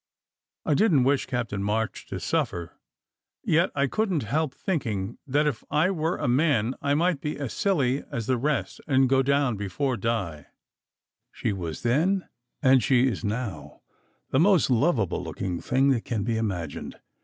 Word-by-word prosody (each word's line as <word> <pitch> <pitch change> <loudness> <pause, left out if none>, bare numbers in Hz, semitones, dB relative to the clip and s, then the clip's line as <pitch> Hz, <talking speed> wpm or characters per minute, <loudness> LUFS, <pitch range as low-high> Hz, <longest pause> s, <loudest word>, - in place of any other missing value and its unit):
I - - +2
didn 190 -1 +4
t 130 - +4
wish 135 +1 +1
Captain 115 -6 -2
March 110 +2 -2
to - - -5
suffer, 85 -1 -2 0.7
yet 170 +3 +3
I 140 0 +2
couldn 190 - 0
t 130 - -5
help 145 +5 -1
thinking 115 - -3
that 145 +3 +2
if 135 -7 -1
I 160 +6 +2
were 165 -1 -1
a - - -2
man 130 -3 +2
I 140 0 +1
might 170 -2 +1
be 150 - -3
as 135 -8 -4
silly 140 - +1
as 115 -2 -3
the 125 +1 +1
rest 145 +2 -1
and 135 -2 +4
go 135 +1 +3
down 140 -4 +1
before 120 +7 -2
Di. 95 -9 -2 0.8
She - - -2
was 85 -5 -5
then 170 +11 +1 0.4
and 130 -1 +6
she 130 0 +3
is 115 -5 -3
now 110 +1 -4 0.5
the 130 - +3
most 175 -5 +4
lovable 120 - +1
looking 90 -3 -4
thing 135 +2 +2
that 125 -4 +1
can 110 -4 -2
be 115 +1 -1
imagined. 95 -9 -4
130 Hz, 170 wpm, -26 LUFS, 110-150 Hz, 0.8 s, and